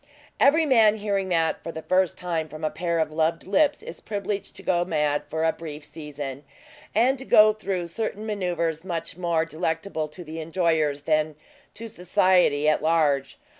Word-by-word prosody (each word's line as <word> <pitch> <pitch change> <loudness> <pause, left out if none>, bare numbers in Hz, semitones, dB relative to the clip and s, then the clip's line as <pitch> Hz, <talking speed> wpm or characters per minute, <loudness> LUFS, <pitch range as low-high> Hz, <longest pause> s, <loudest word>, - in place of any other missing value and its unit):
Every 315 +4 +5
man 225 -6 +5
hearing 200 -3 -2
that 165 -2 +1
for 165 - -6
the 160 -1 -8
first 185 -1 +1
time 165 -3 -3
from 155 +1 -10
a 155 - 0
pair 170 0 -2
of 160 -1 0
loved 160 +1 0
lips 295 - +2
is 485 - -8
privileged 200 -1 -4
to - - -11
go 175 -1 +2
mad 150 -4 0
for 160 0 -2
a 160 - +3
brief 155 -2 -8
season, 150 -3 -7 0.5
and 250 +4 +3
to - - -6
go 215 -3 +6
through 195 -4 -3
certain 210 +4 -4
manoeuvers 175 -6 -2
much 170 -4 -4
more 170 -2 0
delectable 160 +1 -3
to 175 +4 -10
the 160 0 -7
enjoyers 160 -3 0
than 155 0 +1 0.4
to 230 - -7
society 180 -6 +2
at 155 - +3
large. 155 -4 +1
170 Hz, 175 wpm, -25 LUFS, 155-200 Hz, 0.5 s, go